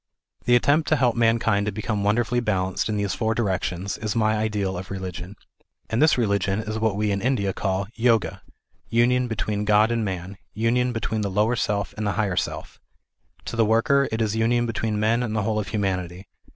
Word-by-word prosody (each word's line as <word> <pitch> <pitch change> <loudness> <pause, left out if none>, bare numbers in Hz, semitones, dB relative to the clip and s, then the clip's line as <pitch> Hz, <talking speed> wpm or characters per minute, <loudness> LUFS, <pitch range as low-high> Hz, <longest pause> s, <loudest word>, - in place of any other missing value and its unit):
The 120 - +5
attempt 145 +6 +3
to 155 - +4
help 125 -5 +2
mankind 115 -3 +2
to - - 0
become 105 0 -2
wonderfully 120 +4 +1
balanced 95 -4 -1
in 105 - -1
these 100 -1 -1
four 110 -1 -1
directions, 95 -3 -2
is 110 0 -3
my 110 -1 +2
ideal 105 -3 -1
of 90 +1 -6
religion. 95 0 -6 0.6
And 115 - +1
this 155 -3 +5
religion 100 -3 +1
is 110 0 -4
what 110 -3 +1
we 105 0 0
in 100 0 -1
India 110 -6 0
call 95 0 -1
" - - -26 0.2
Yoga," 115 -2 +1 0.5
union 125 +2 +2
between 105 -2 -2
God 105 +2 +4
and 115 -1 0
man, 95 0 -5 0.2
union 120 +3 +1
between 110 -1 -2
the 100 - -1
lower 105 +5 +1
self 100 -3 -1
and 105 -1 -2
the 100 - 0
higher 100 -1 0
self. - - -4 0.7
To - - -5
the 115 - +3
worker, 115 +6 +3
it 110 +1 0
is 110 0 -1
union 120 +2 +2
between 110 -2 -2
men 110 +3 +2
and 110 -3 -2
the 105 - 0
whole 110 0 0
of 105 - -4
humanity. 95 -2 -3
110 Hz, 205 wpm, -24 LUFS, 100-115 Hz, 0.7 s, The